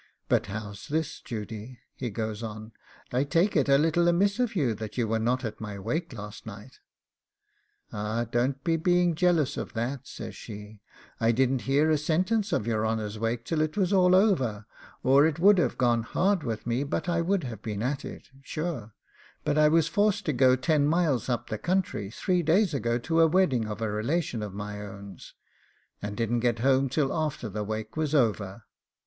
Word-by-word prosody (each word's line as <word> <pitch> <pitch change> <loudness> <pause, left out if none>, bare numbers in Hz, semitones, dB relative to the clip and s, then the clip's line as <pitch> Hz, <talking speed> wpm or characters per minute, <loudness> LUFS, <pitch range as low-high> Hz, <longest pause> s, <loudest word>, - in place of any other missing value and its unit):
'But - - +2
how's 105 +3 -7
this, 155 0 -2
Judy?' 110 +2 -7 0.2
he 125 - -4
goes 110 0 -4
on. 110 0 -7 0.4
'I 130 +3 +2
take 165 +8 +2
it 145 -3 +2
a 140 - +6
little 165 +3 +2
amiss 200 +6 +2
of 245 -4 0
you 135 -10 +1
that 110 +1 -7
you 120 -2 +1
were 110 +1 0
not 125 +3 0
at 110 -1 -6
my 105 -2 -5
wake 155 - -3
last 105 -1 -8
night.' 105 +4 -10 1.1
'Ah, 105 +3 -2
don't 125 +4 -1
be 165 -1 +1
being 175 +1 +2
jealous 170 -4 +2
of - - -5
that,' 125 +4 -3
says - - -8
she; 105 -1 -10 0.4
'I 115 0 +3
didn't 130 +1 +2
hear 150 +3 +3
a 155 - +3
sentence 185 +8 0
of 105 - 0
your 110 -2 0
honour's 110 -1 -2
wake 115 +1 -2
till 160 -2 0
it 155 +4 -1
was 190 -1 +2
all 180 -1 +5
over, 130 - +2 0.4
or 140 +3 +6
it 160 - -2
would 195 +3 +6
have - - 0
gone 120 -2 +2
hard 185 - +1
with 115 -5 -4
me 120 +3 0
but 145 - -3
I 170 -1 +1
would 185 +1 0
have 115 -5 -6
been 105 -1 -4
at 135 +2 -2
it, - - -9
sure; 140 -8 -5 0.5
but - - 0
I 155 0 +5
was 160 0 +3
forced 205 +2 +1
to 155 - 0
go 130 0 +5
ten 145 +2 +2
miles 155 -7 +1
up 120 -2 -2
the 110 - -2
country 180 - -1
three 180 - 0
days 170 +3 +3
ago 120 -4 0
to 165 +7 +1
a 165 - +7
wedding 155 - +2
of 105 +1 -5
a 110 - -1
relation 120 +3 -1
of 105 -2 -4
my 105 0 -5
own's, 100 -2 -10 0.7
and 105 0 -5
didn't 120 0 0
get 120 -1 +1
home 135 +3 +2
till 135 +1 0
after 155 -6 -2
the 105 +1 -3
wake 110 +1 -5
was 155 -1 0
over. 110 -5 0
130 Hz, 200 wpm, -27 LUFS, 110-160 Hz, 1.1 s, a